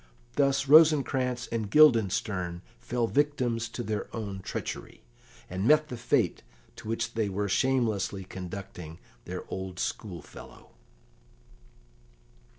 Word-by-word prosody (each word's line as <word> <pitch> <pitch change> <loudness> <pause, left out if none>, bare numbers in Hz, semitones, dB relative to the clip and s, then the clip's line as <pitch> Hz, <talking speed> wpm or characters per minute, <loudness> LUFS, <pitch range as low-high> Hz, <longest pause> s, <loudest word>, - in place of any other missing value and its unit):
Thus 140 -1 +2
Rosencrantz 135 -5 +5
and 110 -3 -2
Guildenstern 100 - +3 0.2
fell 120 -1 -1
victims 125 -4 0
to 120 - -5
their 110 -2 -3
own 100 -4 -4
treachery, 95 - -6 0.4
and 95 +4 -2
met 155 +1 +5
the 125 - -4
fate 115 - +1 0.4
to - - -10
which 115 +1 -2
they 110 -3 0
were 100 +1 -2
shamelessly 110 -4 0
conducting 90 -3 -8 0.3
their - - -5
old 95 -1 -5
schoolfellow. 90 -1 -7
115 Hz, 110 wpm, -28 LUFS, 95-130 Hz, 0.4 s, Rosencrantz